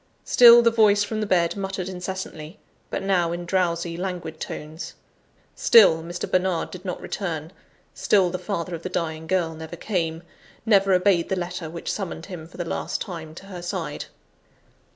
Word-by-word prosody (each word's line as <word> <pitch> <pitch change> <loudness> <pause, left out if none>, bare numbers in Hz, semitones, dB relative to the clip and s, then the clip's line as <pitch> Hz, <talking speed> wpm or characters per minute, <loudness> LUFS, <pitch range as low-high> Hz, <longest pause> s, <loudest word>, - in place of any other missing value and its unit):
Still, 235 -1 +8
the 230 - +5
voice 210 -2 +4
from 215 +1 -3
the 215 - -1
bed 170 -3 +2
muttered 195 -2 -4
incessantly; 180 -2 -6 0.3
but - - -3
now, 180 -4 +2
in 175 0 -4
drowsy, 170 -2 0
languid 175 -4 -5
tones: 155 +3 -7 0.6
still, 180 -8 +6
Mr. 175 +2 -5
Bernard 185 -2 0
did 185 -1 -9
not 180 -2 -4
return: 165 -5 -4 0.4
still 190 -4 +2
the 185 - -3
father 180 -4 -3
of 165 - -5
the 185 - -5
dying 160 -3 -3
girl 175 -2 0
never 160 +1 -8
came, 170 -3 -2 0.4
never 200 -3 +4
obeyed 180 -2 +3
the 190 - +1
letter 175 -2 -4
which 170 +1 -4
summoned 180 -4 -5
him 175 -5 -8
for 175 - -15
the 175 - -3
last - - -3
time 160 -5 -7
to 195 - -11
her 185 -3 -8
side. 175 - -4
180 Hz, 170 wpm, -24 LUFS, 165-195 Hz, 0.6 s, Still